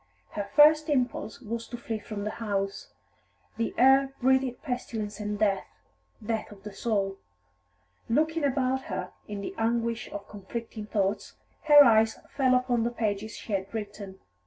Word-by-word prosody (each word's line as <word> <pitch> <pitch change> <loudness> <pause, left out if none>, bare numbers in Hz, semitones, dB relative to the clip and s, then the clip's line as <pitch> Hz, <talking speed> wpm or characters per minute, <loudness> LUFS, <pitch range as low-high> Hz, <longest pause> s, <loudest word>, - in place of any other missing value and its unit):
Her 200 -1 -4
first 305 +1 +7
impulse 250 -5 -1
was 230 0 -5
to 240 - -6
flee 225 -2 -4
from 210 -1 -6
the 210 - -2
house; 195 - -2 0.7
the 230 0 -1
air 270 +1 +5
breathed 260 -1 +2
pestilence 225 -6 -4
and 210 0 -3
death, 200 -2 +1 0.6
death 225 -1 -2
of 200 -1 -14
the 210 -1 -8
soul. 195 -2 -1 0.9
Looking 315 +6 +1
about 265 -1 +1
her 185 -2 -4 0.2
in 205 -1 -5
the - - -5
anguish 230 0 0
of 205 0 -7
conflicting 210 +1 -7
thoughts, 200 -1 -1 0.3
her 295 -1 +9
eyes 220 -3 +4
fell 260 -2 +3
upon 250 -2 +1
the 235 - +1
pages 220 -2 -2
she 215 - -7
had 190 0 -2
written. 205 -3 -6
225 Hz, 155 wpm, -28 LUFS, 205-255 Hz, 0.9 s, her